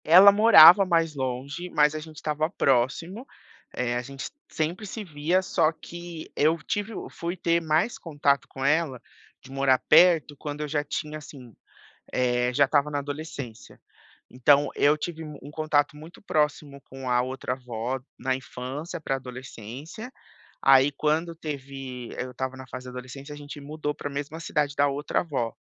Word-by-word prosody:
Ela 185 +6 +9
morava 200 -3 +9
mais 165 -3 +1
longe, 135 +6 -4
mas 150 -2 +3
a 155 - -3
gente 155 0 -11
estava 155 +1 -1
próximo, 165 - 0 0.5
eh, 120 -1 -1
a 120 - 0
gente 135 +2 -7 0.2
sempre 170 +7 -2
se 215 +3 -6
via, 165 +1 0
só 165 -3 +2
que 170 0 -9
eu 155 +3 +3
tive 205 +2 -2 0.2
fui 170 +2 -5
ter 170 0 +1
mais 160 +8 +1
contato 145 -4 0
com 135 0 -5
ela, 145 -3 +1 0.4
de 135 - -13
morar 135 -1 +3
perto, 165 -5 +6
quando 145 +1 -6
eu 150 - -2
já 145 0 -1
tinha, 150 +1 -4
assim, 130 -6 -12 0.6
eh, 125 0 +1
já 140 - +5
estava 145 +1 +2
na 145 -1 -1
adolescência. 140 -5 -7 0.5
Então, 140 +3 +4
eu 145 +1 +4
tive 160 +1 -5
um 145 -2 -10
contato, 150 -1 +1
muito 155 +3 -13
próximo 150 -5 -1
com 130 -1 -7
a 125 0 +3
outra 130 0 -3
avó, 125 0 -4 0.2
na 130 0 0
infância 135 +5 -6
para 135 -3 -1
adolescência, 130 - -9 0.5
aí 135 +1 +6
quando 160 +3 0
teve 135 -5 -7
eu 125 - -3
estava 130 +1 -4
na 130 0 -10
fase 130 0 -7
de 125 - -8
adolescência, 130 +3 -8
gente 145 0 -9
mudou 150 +1 -4
para 145 - -5
a - - -10
mesma 145 +3 -5
cidade 150 -3 -1
da 145 - +4
outra 140 +2 -1
avó. 130 -9 -2
145 Hz, 165 wpm, -26 LUFS, 130-160 Hz, 0.6 s, Ela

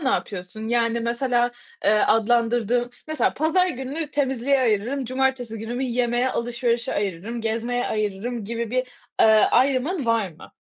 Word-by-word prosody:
ne 275 - 0
yapıyorsun 215 -3 -3
yani 235 0 +1
mesela, 240 +1 +1 0.3
eee, - - +5
adlandırdığın, 235 +2 +2 0.2
mesela 310 -1 +1
pazar 325 +5 +2
gününü 280 +2 -4
temizliğe 270 -1 +1
ayırırım 245 +4 0
cumartesi 255 -2 -1
günümü 240 +4 -3
yemeğe, 245 0 +1
alışverişe 235 0 -1
ayırırım, 200 +4 -3
gezmeye 230 +2 -1
ayırırım 215 +2 -2
gibi 230 +1 -3
bir, 255 +1 0 0.4
ııı, 220 - +7 0.2
ayrımın 270 +4 +1
var 225 -4 +2
mı? 160 - -15
240 Hz, 135 wpm, -23 LUFS, 225-260 Hz, 0.4 s, ııı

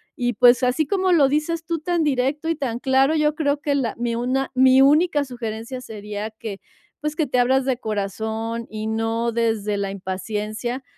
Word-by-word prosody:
Y, 245 0 -1
pues, 245 +4 +5
así 255 +5 +1
como 375 +3 +1
lo 295 -5 +5
dices 320 +3 -1
tú, 335 -1 -2
tan 340 +1 0
directo 285 +2 0
y 330 - +1
tan 260 -6 -3
claro, 265 +4 +2
yo 300 -1 +2
creo 290 -2 0
que 290 - 0
la 265 -5 -1
mi 235 0 -1
una 255 +3 -1
mi 260 0 +6
única 295 +1 +4
sugerencia 240 0 -6
sería 210 -2 -6
que, 215 -2 -8 0.4
pues, 300 0 -2
que 315 - +1
te 250 -2 0
abras 260 +2 +3
de 260 -2 0
corazón 220 +2 -3
y 215 0 -5
no 225 +1 -1
desde 220 -3 0
la 200 -1 -2
impaciencia, 210 +6 -4
250 Hz, 185 wpm, -22 LUFS, 220-285 Hz, 0.4 s, mi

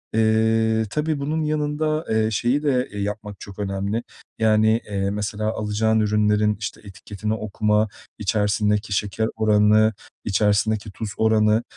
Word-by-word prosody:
Eee, 110 0 +2
tabii 150 +5 -1
bunun 155 +3 -1
yanında, 155 +1 -1
eee, 110 0 +1
şeyi 125 +7 0
de 130 -4 +1
yapmak 105 0 -5
çok 100 0 -11
önemli, 100 +3 -2 0.4
yani, 110 +1 +3
eee, 100 -1 -1
mesela 105 +1 -2
alacağın 110 +1 0
ürünlerin, 105 0 +2
işte, 105 - -6
etiketini 105 +1 -5
okuma, 105 0 0 0.3
içerisindeki 105 0 0
şeker 105 +2 -1
oranı, 110 0 +4 0.3
içerisindeki 105 +1 +1
tuz 110 +2 -5
oranı, 110 0 +3
110 Hz, 120 wpm, -22 LUFS, 105-110 Hz, 0.4 s, oranı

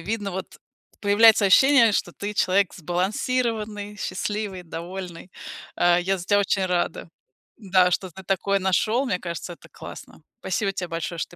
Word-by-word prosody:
Видно, 205 +3 -3
вот, 190 0 -7 0.4
появляется 205 0 +5
ощущение, 235 +2 +6
что 175 - -1
ты- 205 +1 -6
человек 190 -1 +2
сбалансированный, 210 - -2
счастливый, 200 -1 -4
довольный. 175 +1 -8 0.5
А, 175 0 +4
я 190 +2 0
за 175 - -7
тебя 205 +1 +3
очень 195 -1 0
рада. 175 -1 -2 0.5
Да, 185 -4 +2
что 185 +1 -2
ты 190 +3 -12
такое 195 +1 0
нашёл, 215 +7 +1
мне 185 -8 -1
кажется, 170 0 -6
это - - -18
классно. - - -11 0.2
Спасибо 195 +2 -1
тебе 180 -2 -5
большое, 165 +1 -4
что - - -4
190 Hz, 155 wpm, -24 LUFS, 180-210 Hz, 0.5 s, ощущение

